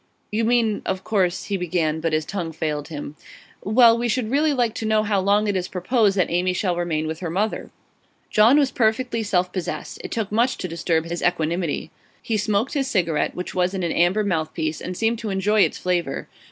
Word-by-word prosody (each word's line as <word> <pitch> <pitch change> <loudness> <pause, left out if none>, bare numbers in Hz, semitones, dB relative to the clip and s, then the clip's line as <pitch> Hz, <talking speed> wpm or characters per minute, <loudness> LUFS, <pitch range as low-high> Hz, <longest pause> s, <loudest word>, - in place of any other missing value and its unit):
'You 220 +2 0
mean, 230 -3 +2
of 190 0 -3
course 185 -5 0
' - - -10
he 200 - -1
began; 165 -3 -1
but 165 0 -1
his 155 0 0
tongue 175 -3 -4
failed 150 -2 -3
him. 150 -2 -7 0.5
'Well, 230 +2 +6
we 240 +1 -1
should 230 -1 -1
really 300 +3 +3
like 240 -5 +1
to 225 - -3
know 215 0 +3
how 205 -2 +1
long 205 +2 +2
it 205 - 0
is 185 -1 -1
proposed 200 +2 +1
that 180 - +1
Amy 180 +1 +1
shall 180 -1 0
remain 165 -3 -1
with 160 0 -4
her 175 - -4
mother.' 205 +6 -2 0.6
John 225 +6 +6
was 280 -3 +3
perfectly 230 +1 +1
self 185 -4 0
possessed; 185 -3 -5
it - - -5
took 220 -3 -3
much 235 +4 +2
to - - -4
disturb 165 -1 -1
his 170 +1 -4
equanimity. 170 -1 -1 0.3
He 225 - -2
smoked 210 - 0
his 275 -3 0
cigarette, 170 - 0
which 180 - -5
was 180 +1 0
in 185 - -2
an 170 - 0
amber 180 +5 +2
mouthpiece, 160 -4 -2
and 180 0 -5
seemed 225 0 +1
to 225 - -4
enjoy 205 +2 +2
its - - +2
flavour. 175 -6 -2
190 Hz, 215 wpm, -23 LUFS, 170-220 Hz, 0.6 s, Well